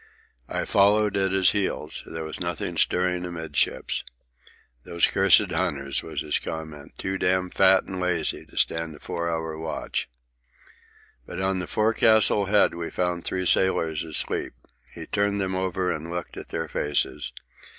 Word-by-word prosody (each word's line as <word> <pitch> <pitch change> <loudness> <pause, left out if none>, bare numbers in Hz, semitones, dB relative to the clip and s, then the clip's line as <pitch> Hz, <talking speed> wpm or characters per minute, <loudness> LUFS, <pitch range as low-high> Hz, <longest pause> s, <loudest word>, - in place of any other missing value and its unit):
I - - -2
followed 105 +1 +3
at 95 -1 +1
his 95 -1 +4
heels. 100 -2 -1
There 80 0 -6
was 80 0 -3
nothing 85 -2 -3
stirring 90 0 +1
amidships. 80 -4 -1 0.8
"Those 85 -1 +2
cursed 95 -1 +4
hunters," 70 -1 -1
was - - -5
his 75 - 0
comment. 80 -2 -7
"Too 95 0 -3
damned 90 0 0
fat 95 0 +5
and 95 - -6
lazy 90 -3 -1
to - - -17
stand 80 -1 0
a - - -14
four 85 +4 -3
hour 80 -1 -3
watch." 80 -5 -4 1.2
But - - -6
on 95 0 0
the 90 - -4
forecastle 110 -1 +4
head 105 +1 +3
we 85 -1 -5
found 90 -1 -2
three 95 0 -2
sailors 80 -4 +1
asleep. 80 -2 +2 0.4
He - - -9
turned 100 0 0
them 95 -1 -1
over 95 -1 -1
and 80 +2 -7
looked 85 0 -5
at - - -8
their 80 0 -4
faces. 75 -1 -1
90 Hz, 155 wpm, -25 LUFS, 80-95 Hz, 1.2 s, fat